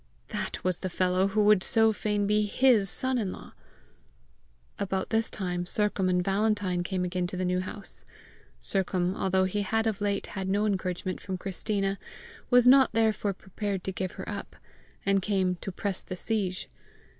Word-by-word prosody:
That - - -4
was 185 -2 0
the 185 - -3
fellow 185 +1 +2
who 210 +2 +2
would 205 -2 +5
so 225 -3 +4
fain 210 -1 0
be 210 +1 +2
HIS 225 -3 +4
son 260 +4 0
in 200 -5 -1
law! - - -10 1.3
About 190 -1 -2
this 225 0 +2
time 180 -2 -3
Sercombe 205 -2 +1
and 180 -1 +1
Valentine 200 -2 +1
came 180 0 -1
again 180 0 -1
to 180 - -6
the 185 - -1
New 180 0 +1
House. 195 +2 -6 0.6
Sercombe, 185 -1 +1
although 190 0 +2
he 190 +2 0
had 225 +3 0
of 215 -2 -1
late 200 -1 0
had 190 -1 -3
no 205 +2 +2
encouragement 185 -2 -2
from 190 -1 -4
Christina, 195 +1 -2 0.5
was 245 -1 +6
not 265 -1 +7
therefore 215 -2 +2
prepared 195 0 -4
to 190 - -2
give 185 0 -3
her - - -7
up, - - -6 0.5
and 195 0 +3
came 190 -2 +1
"to 195 - -6
press 195 +1 -3
the 185 - -6
siege." 190 -2 -2
195 Hz, 175 wpm, -28 LUFS, 185-210 Hz, 1.3 s, not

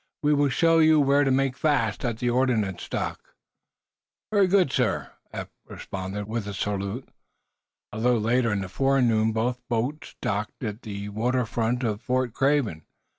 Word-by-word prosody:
"We 150 +1 +4
will 145 -1 +3
show 165 +4 +3
you 155 -1 +6
where 140 0 +4
to 140 - +1
make 135 0 +1
fast 115 - 0
at 115 -2 -1
the 120 +1 0
ordnance 115 -7 0
dock." - - -4 1.0
"Very 200 -3 +4
good, 185 -6 +3
sir," 125 -7 0 0.2
Eph - - -6 0.2
responded, 95 +2 -6
with 110 -1 -3
a 100 - -5
salute. 100 +5 -3 0.8
A 105 - -6
little 120 0 +3
later 115 +2 +2
in 100 -1 0
the 95 - -4
forenoon 115 0 +2
both 120 +3 -1
boats 125 +6 -2
docked 105 +4 -3
at 105 0 -4
the 100 -1 -6
water 120 +4 0
front 120 +3 -1
of 110 -3 -1
Fort 125 -2 -1
Craven. 135 - +1
120 Hz, 165 wpm, -25 LUFS, 105-135 Hz, 1.0 s, you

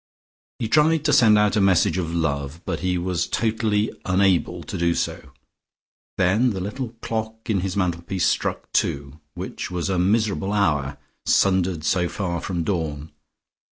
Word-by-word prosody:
He 115 - -2
tried 155 +4 +3
to 150 - +3
send 110 -3 +6
out 105 0 +3
a 105 - +3
message 95 -2 +3
of 85 -2 -3
love, 80 -1 -2
but - - -2
he 90 -1 0
was 90 -1 -1
totally 110 -1 0
unable 95 -2 +1
to - - -7
do 85 0 +1
so. - - -3 0.9
Then 105 +7 +3
the 95 - -4
little 115 +5 -5
clock 110 0 -3
in 100 - +1
his 95 +1 -3
mantelpiece 90 0 -1
struck - - -1
two, 70 +2 -1 0.2
which - - -5
was 90 +1 -2
a 95 - +1
miserable 100 +1 +1
hour, 75 -9 +1 0.3
sundered 95 -4 +2
so 85 +3 +1
far 85 -4 -3
from 85 -3 -2
dawn. 80 -5 -3
95 Hz, 160 wpm, -23 LUFS, 85-105 Hz, 0.9 s, send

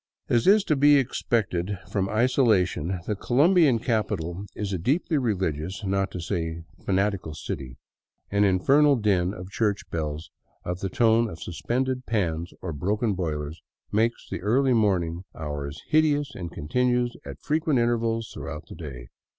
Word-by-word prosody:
As 120 -2 +2
is 205 +1 +6
to 155 - +1
be 145 +1 +6
expected 105 -7 0
from 100 -2 +1
its 95 - -5
isolation, 95 - +2
the 105 - -1
Colombian 145 - +4
capital 100 -6 -2
is 100 -2 -3
a 95 - -1
deeply 145 - +1
religious, 95 - -2
not 95 0 0
to 90 - -6
say 80 -1 -3 0.2
a - - -23
fanatical, 95 -5 0
city. 65 -4 -6 0.5
An 100 +1 +3
infernal 135 +10 +4
din 100 -6 +1
of 90 -1 -9
church 105 -2 0
bells 80 -1 -4 0.3
of 90 +1 -3
the 95 - -2
tone 115 +3 +3
of 80 - -9
suspended 130 +8 -2
pans 85 -6 -1
or 85 -3 -3
broken 105 +8 0
boilers 80 -3 -3 0.3
makes 115 +3 0
the - - -5
early 125 +6 +3
morning 90 -6 +1
hours 75 -1 -5
hideous 150 -3 +2
and 85 -3 -6
continues 125 +8 0
at - - -9
frequent 155 -2 +1
intervals 115 -1 0
throughout 75 - -7
the - - -8
day. 65 -7 -8
100 Hz, 155 wpm, -26 LUFS, 85-120 Hz, 0.5 s, is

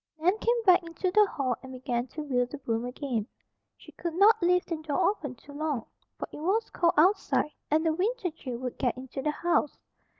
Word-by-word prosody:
Nan 350 +5 +2
came 470 0 +1
back 365 -1 +7
into 340 +2 -3
the 420 +1 +5
hall 260 -8 -1
and 260 - -10
began 250 -1 -2
to 305 +4 -6
wield 250 -4 0
the 295 - -6
broom 230 -3 -2
again. 245 -4 -3 0.5
She - - -15
could 340 -2 -5
not 405 +4 +6
leave 360 +1 +3
the 330 - -3
door 310 +3 +1
open 290 -11 -7
too 280 - -15
long, 290 -5 -2 0.3
for - - -5
it - - -9
was 390 +8 0
cold 340 -1 +2
outside 345 -2 +3 0.2
and 315 +2 +2
the 320 - +3
winter 385 +2 -1
chill 260 -6 -6
would 250 0 -5
get 250 -2 0
into 265 +1 -6
the 300 - 0
house. 300 -1 0
310 Hz, 210 wpm, -28 LUFS, 260-360 Hz, 0.5 s, back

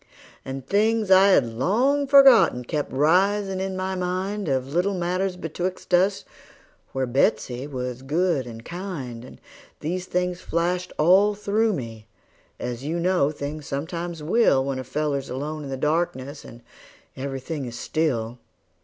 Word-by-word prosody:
And 135 -1 -6
things 215 +3 +1
I 190 +1 +7
had 185 -10 +5
long 235 - +1
forgotten 265 - +6
kept 150 +3 -3
risin' 190 +7 +2
in 190 0 -3
my 190 0 -2
mind, 185 +2 -2
Of 135 +1 -1
little 185 +4 +1
matters 180 +1 -1
betwixt 180 +2 -5
us, 190 +3 +3 0.7
where 135 0 -1
Betsey 125 0 0
was 125 -3 -5
good 150 -1 0
and 115 -1 -10
kind; 165 -10 -6
And 130 - -13 0.4
these 180 +4 -3
things 180 0 -1
flashed 180 +2 -1
all 190 +6 +5
through 210 +2 +1
me, 115 - -7 0.5
as 125 +1 -5
you 160 +4 -2
know 175 -4 +2
things 150 0 -6
sometimes 165 +3 -4
will 150 - +3
When 135 -1 -2
a - - -4
feller's 140 +1 -2
alone 150 +4 -4
in - - -7
the 135 - -3
darkness, 145 -2 -1
and 120 0 -13 0.5
every 135 0 -4
thing 145 +1 -5
is 120 -1 -7
still. 125 -6 -1
160 Hz, 150 wpm, -24 LUFS, 135-185 Hz, 0.7 s, I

